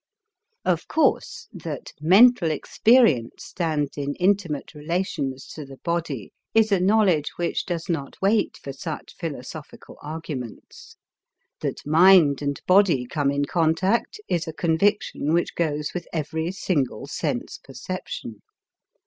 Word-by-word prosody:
Of - - 0
course, 320 - 0
that - - -7
mental 195 +3 +6
experience 210 - +2
stands 155 -5 -2
in 145 0 -3
intimate 180 -7 0
relations 150 -4 -3
to 155 - -7
the 135 -1 -12
body 165 - -3 0.2
is 220 -1 +4
a 195 - +4
knowledge 185 -5 +3
which 175 +2 -2
does 170 -2 -3
not 160 -6 -4
wait 210 +3 +1
for 135 - -8
such 155 +3 -7
philosophical 150 -2 -8
arguments. 150 -6 -8 0.6
That - - -4
mind 160 -2 +6
and 140 -1 -2
body 180 -9 +4
come 140 +2 0
in 140 0 0
contact 175 - +1
is 170 -2 -1
a 160 - -5
conviction 160 -1 +1
which 170 +1 +1
goes 150 -3 -2
with 180 - -5
every 160 +1 -2
single 165 -9 -1
sense - - -3
perception. 130 - -7
160 Hz, 125 wpm, -24 LUFS, 145-185 Hz, 0.6 s, mental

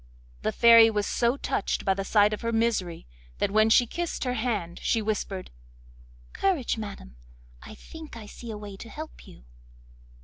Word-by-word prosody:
The - - 0
fairy 230 -1 +7
was 210 -2 -1
so 240 +3 +1
touched 205 - -2
by 195 - +3
the 195 +1 -3
sight 205 +1 +3
of 215 - -4
her 230 - -1
misery 225 -7 -1 0.3
that - - 0
when 215 +1 +4
she 240 +2 +5
kissed 345 +8 -4
her 250 -1 -1
hand 215 -8 -2
she 230 - +1
whispered: 205 -3 -3 0.8
'Courage, 365 -11 0
madam! 200 - -8 0.4
I - - -11
think 320 -6 -11
I 220 - -9
see 235 +3 -10
a 215 - -5
way 205 -2 -9
to 230 - -10
help 310 +5 -9
you. - - -15
220 Hz, 175 wpm, -27 LUFS, 205-235 Hz, 0.8 s, fairy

